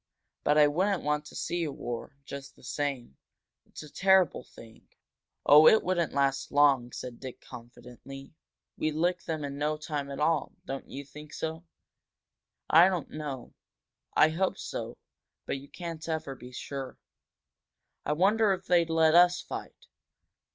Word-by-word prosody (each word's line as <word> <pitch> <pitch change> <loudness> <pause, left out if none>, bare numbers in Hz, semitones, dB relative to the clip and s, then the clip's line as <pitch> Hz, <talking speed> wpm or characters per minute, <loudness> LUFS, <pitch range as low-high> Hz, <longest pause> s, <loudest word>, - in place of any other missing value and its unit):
"But 150 - +3
I 150 - +7
wouldn't 185 +5 +1
want 150 0 0
to - - -12
see 175 0 -2
a 155 - -2
war, 120 +1 -6
just 140 0 -8
the - - -21
same. 130 - -4 0.5
It's - - -10
a 150 - -13
terrible 190 -7 +3
thing." 115 -1 -16 0.6
"On, 150 +2 +9
it 220 - +4
wouldn't 175 -3 0
last 140 -1 0
long," 140 -4 +4
said 125 -1 -7
Dick, 130 -2 -8
confidently. 125 +3 -12 0.4
"We'd 155 -1 -1
lick 175 +2 0
them 155 -2 -3
in 140 0 -6
no 150 +1 0
time 150 -2 -4
at 140 0 -6
all. 155 -1 +1
Don't 135 0 -6
you 140 +1 -7
think 150 +2 -12
so?" 160 +1 -5 1.0
"I 170 +4 +7
don't 180 -5 -3
know 145 -5 -6 0.6
I 155 - +6
hope 185 +4 -1
so. - - -6 0.5
But 135 - -3
you 140 - -14
can't 165 -2 -7
ever 160 -4 -3
be 125 -1 -12
sure." 135 +1 -6 1.1
"I 150 - 0
wonder 200 +5 +3
if 185 - -6
they'd 170 -2 +3
let 160 -1 +4
us 175 +1 +6
fight?" - - -8
150 Hz, 160 wpm, -29 LUFS, 135-165 Hz, 1.1 s, On